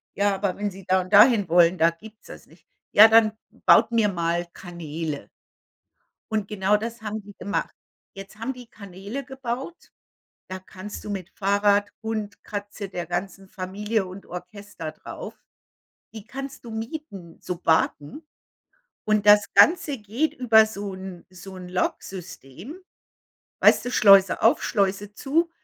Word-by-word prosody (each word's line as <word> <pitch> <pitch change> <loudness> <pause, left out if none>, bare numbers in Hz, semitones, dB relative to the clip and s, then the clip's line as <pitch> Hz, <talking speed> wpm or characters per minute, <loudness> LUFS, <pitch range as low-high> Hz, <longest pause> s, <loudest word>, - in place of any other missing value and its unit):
„Ja, 200 0 +2
aber 195 -1 -2
wenn 205 0 -3
Sie 190 0 -13
da 185 0 +3
und 185 +2 -10
dahin 210 -3 +6
wollen, 175 +1 +4
da 165 0 +4
gibt's 215 +6 -14
das - - -12
nicht.“ - - -22 0.3
„Ja, 215 +2 +9
dann 220 -1 +5 0.3
baut - - +6
mir 225 -2 +3
mal 170 -2 -1
Kanäle.“ 160 -4 -6 1.0
Und 215 -2 -1
genau 205 0 +1
das 230 +2 -6
haben 215 0 -5
die 205 0 -14
gemacht. 200 - -3 0.4
Jetzt 195 +2 -11
haben 235 +4 -3
die 250 -2 -13
Kanäle 200 +7 -8
gebaut. 265 +4 -6 0.6
Da 185 - -5
kannst 190 +2 -10
du 210 - -6
mit 190 -3 -5
Fahrrad, 205 +1 +1
Hund, 220 -2 -5
Katze, 205 0 -6
der 180 -2 -5
ganzen 190 +3 -5
Familie 200 +2 -3
und 185 +2 -10
Orchester 180 -2 -8
drauf - - -9 0.8
die 220 -2 -9
kannst 275 0 -8
du 235 - -9
mieten, 220 - -7
Sobaten. 165 - -1 0.8
Und 215 -1 +1
das 205 0 +6
Ganze 325 -5 +4
geht 225 +9 -2
über 220 -4 +5
so 205 -2 -6
'n 185 -2 -9
so 185 +1 -11
'n 180 -1 -9
Logsystem. 180 - -5 0.8
Weißt - - +5
du, 245 - -2
Schleuse 195 -4 +6
auf, 225 - +4
Schleuse 200 +1 -1
zu. 320 +8 0
205 Hz, 145 wpm, -24 LUFS, 185-220 Hz, 1.0 s, Ja